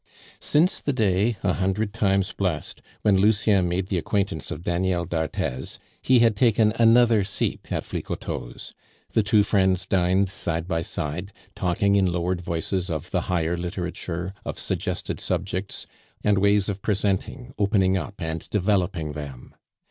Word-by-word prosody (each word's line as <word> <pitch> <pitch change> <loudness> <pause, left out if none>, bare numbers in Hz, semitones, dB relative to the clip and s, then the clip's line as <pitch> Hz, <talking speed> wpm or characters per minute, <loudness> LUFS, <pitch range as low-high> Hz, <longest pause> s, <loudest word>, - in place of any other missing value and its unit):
Since 165 +5 +2
the 145 - -1
day, 105 -1 +2
a 90 -3 +2
hundred 95 +3 -1
times 100 -3 +1
blessed, 90 -6 -2 0.2
when 100 -2 +4
Lucien 100 -3 +3
made 90 +2 -1
the 95 - +1
acquaintance 95 -4 -2
of 80 - -6
Daniel 90 0 0
d'Arthez, 80 -6 -3 0.2
he 130 - +4
had 115 -2 +4
taken 110 -1 +3
another 115 -2 +5
seat 100 +1 -3
at - - -1
Flicoteaux's. - - -5 0.4
The 110 - +3
two 105 0 +4
friends 95 -2 +2
dined 95 +1 +2
side 85 -3 -2
by 80 -3 0
side, 85 +5 -4 0.2
talking 100 +2 +1
in 95 -2 +3
lowered 90 +1 -1
voices 90 +2 -2
of 80 -3 -4
the - - +1
higher 85 -1 0
literature, 90 0 -4
of - - -5
suggested - - -3
subjects, 95 +1 -3 0.4
and 105 -2 +3
ways 100 0 +3
of 100 -1 -3
presenting, 105 +5 -1
opening 100 -2 +3
up, 95 +3 -4
and 80 0 -4
developing 95 -6 0
them. 70 -4 -8
95 Hz, 150 wpm, -24 LUFS, 85-105 Hz, 0.4 s, another